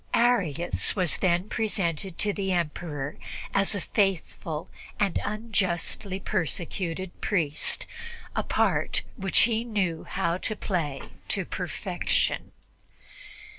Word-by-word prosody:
Arius 185 Hz, -, +2 dB
was 180 Hz, -5 st, +2 dB
then 180 Hz, +1 st, +2 dB
presented 190 Hz, -6 st, -1 dB
to 205 Hz, -1 st, +1 dB
the 195 Hz, -1 st, -1 dB
Emperor 150 Hz, -4 st, -2 dB, 0.4 s
as 195 Hz, +1 st, +4 dB
a 200 Hz, -, -1 dB
faithful 175 Hz, -6 st, 0 dB, 0.3 s
and 200 Hz, -4 st, +2 dB
unjustly 200 Hz, -3 st, 0 dB
persecuted 180 Hz, 0 st, -2 dB
priest, 160 Hz, -7 st, +1 dB, 0.5 s
a -, -, +2 dB
part -, -, +2 dB
which 195 Hz, -4 st, +4 dB
he 230 Hz, 0 st, +3 dB
knew 195 Hz, -8 st, 0 dB
how 170 Hz, +2 st, 0 dB
to 215 Hz, -, -2 dB
play 160 Hz, -10 st, -1 dB, 0.2 s
to -, -, 0 dB
perfection. -, -, -1 dB
185 Hz, 105 wpm, -28 LUFS, 170-205 Hz, 0.5 s, as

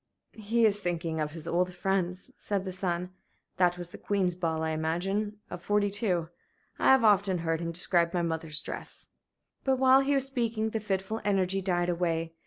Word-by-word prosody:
"He 225 Hz, +2 st, +2 dB
is 205 Hz, -1 st, +3 dB
thinking 170 Hz, -4 st, -2 dB
of 150 Hz, -, -1 dB
his 165 Hz, -1 st, -8 dB
old 180 Hz, +2 st, +1 dB
friends," 185 Hz, 0 st, -1 dB
said 200 Hz, -2 st, -2 dB
the 190 Hz, -, -3 dB
son. 180 Hz, -1 st, -2 dB, 0.5 s
"That 180 Hz, -1 st, +3 dB
was 175 Hz, -1 st, -5 dB
the -, -, -10 dB
Queen's 190 Hz, -3 st, 0 dB
ball, 165 Hz, -2 st, -2 dB
I 160 Hz, -, 0 dB
imagine, 190 Hz, +7 st, -1 dB
of 175 Hz, -, -6 dB
'42. 205 Hz, -3 st, 0 dB, 0.5 s
I -, -, -1 dB
have 265 Hz, -2 st, +6 dB
often 200 Hz, -3 st, +4 dB
heard 165 Hz, -1 st, -1 dB
him 170 Hz, 0 st, -2 dB
describe 170 Hz, 0 st, +2 dB
my 175 Hz, -1 st, 0 dB
mother's 160 Hz, -2 st, -1 dB
dress." -, -, -7 dB, 0.5 s
But 265 Hz, -1 st, +2 dB
while 260 Hz, +1 st, +6 dB
he 275 Hz, +1 st, +2 dB
was 270 Hz, -1 st, +3 dB
speaking 230 Hz, -4 st, -1 dB
the 220 Hz, -, -1 dB
fitful 200 Hz, +1 st, -2 dB
energy 195 Hz, -1 st, +1 dB
died 175 Hz, -2 st, 0 dB
away. 165 Hz, -2 st, -1 dB
185 Hz, 185 wpm, -29 LUFS, 170-205 Hz, 0.5 s, have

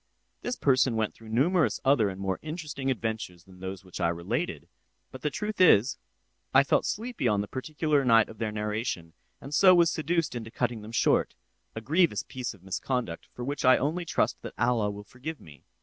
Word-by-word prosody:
This 245 Hz, -, -2 dB
person 130 Hz, -, +3 dB
went 110 Hz, -1 st, 0 dB
through 115 Hz, -1 st, -14 dB
numerous 155 Hz, +9 st, +2 dB
other 130 Hz, -7 st, +4 dB
and 95 Hz, 0 st, -7 dB
more 95 Hz, -1 st, -2 dB
interesting 150 Hz, -4 st, -4 dB
adventures 110 Hz, -8 st, -3 dB
than 95 Hz, 0 st, -17 dB
those 95 Hz, 0 st, -6 dB
which 90 Hz, -1 st, -8 dB
I 85 Hz, -, +3 dB
related; 85 Hz, 0 st, -3 dB, 0.4 s
but 130 Hz, -, -10 dB
the 150 Hz, -, 0 dB
truth 210 Hz, +7 st, -3 dB
is, 125 Hz, -, +5 dB, 0.6 s
I 135 Hz, -, +8 dB
felt 140 Hz, -, +1 dB
sleepy 225 Hz, -, -2 dB
on 105 Hz, -2 st, +2 dB
the 105 Hz, -, -5 dB
particular 150 Hz, +2 st, 0 dB
night 115 Hz, -3 st, +5 dB
of 110 Hz, -, -13 dB
their 110 Hz, -2 st, -1 dB
narration, 105 Hz, -5 st, -3 dB, 0.3 s
and 140 Hz, -, -9 dB
so 185 Hz, +4 st, +7 dB
was 170 Hz, -2 st, +5 dB
seduced 165 Hz, 0 st, 0 dB
into 115 Hz, -2 st, -6 dB
cutting 120 Hz, -1 st, -2 dB
them 105 Hz, +2 st, -9 dB
short—a 115 Hz, -1 st, -1 dB
grievous 150 Hz, -, +2 dB
piece 125 Hz, -3 st, -5 dB
of 95 Hz, -, -22 dB
misconduct, 95 Hz, 0 st, -3 dB
for 125 Hz, -, -7 dB
which 145 Hz, +2 st, -3 dB
I 130 Hz, 0 st, +6 dB
only 160 Hz, +6 st, -1 dB
trust -, -, 0 dB
that -, -, -8 dB
Allah 120 Hz, -3 st, +2 dB
will 105 Hz, 0 st, -7 dB
forgive 135 Hz, +8 st, -7 dB
me. 75 Hz, -4 st, -16 dB
120 Hz, 195 wpm, -28 LUFS, 105-150 Hz, 0.6 s, I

